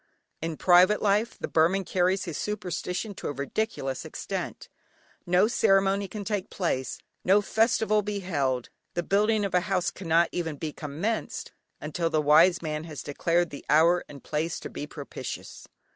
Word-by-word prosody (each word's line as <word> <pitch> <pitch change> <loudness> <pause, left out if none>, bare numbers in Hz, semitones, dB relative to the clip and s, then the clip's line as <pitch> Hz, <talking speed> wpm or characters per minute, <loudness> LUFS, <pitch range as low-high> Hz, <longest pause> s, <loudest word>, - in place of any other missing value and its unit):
In 165 -1 -3
private 185 +3 +5
life 210 +3 +1
the - - -4
Burman 175 +5 +3
carries 185 +1 +1
his 170 -4 -5
superstition 190 +1 -3
to - - -6
a - - -2
ridiculous 140 - -3
extent. - - -5 0.6
No 180 +4 +4
ceremony 195 -3 +3
can 205 +2 -6
take 205 -2 -2
place, 130 -9 -2 0.3
no 195 +3 +5
festival 220 0 +2
be 205 0 -3
held, 135 -9 -1 0.3
the 175 - 0
building 210 +3 +2
of 195 - -4
a 180 - +5
house 185 -3 +1
cannot 170 -2 +2
even 165 -3 -3
be 150 +1 -5
commenced 165 +10 -3 0.3
until 165 +3 -2
the 160 -1 +1
wise 155 +5 +5
man 155 0 -3
has 155 -4 -7
declared 170 +4 0
the 140 - -8
hour 165 +4 +5
and 140 -3 -11
place 160 +3 -2
to - - -7
be 145 - -6
propitious. 140 -4 -7
180 Hz, 160 wpm, -27 LUFS, 155-200 Hz, 0.6 s, private